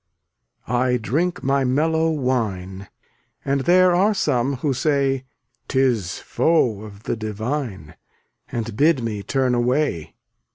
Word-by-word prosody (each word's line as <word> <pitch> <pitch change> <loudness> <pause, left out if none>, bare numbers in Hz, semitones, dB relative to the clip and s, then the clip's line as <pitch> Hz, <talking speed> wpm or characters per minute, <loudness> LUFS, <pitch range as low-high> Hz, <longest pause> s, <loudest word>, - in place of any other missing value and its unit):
316 125 +1 +1
I 125 -1 +2
drink 160 - -1
my 135 0 +2
mellow 160 +5 +1
wine, 105 - -2 0.6
And 140 0 +1
there 180 +1 +5
are 200 +4 +3
some 130 -6 +1
who 140 +2 -1
say 135 -1 0 0.4
'Tis 120 -9 +1
foe 125 -11 +1
of 105 -1 -11
the - - -2
divine, 110 - -4 0.6
And 115 -2 -4
bid 145 -1 +3
me 105 -3 -3
turn 130 +3 0
away. 125 - 0
130 Hz, 125 wpm, -22 LUFS, 110-145 Hz, 0.6 s, there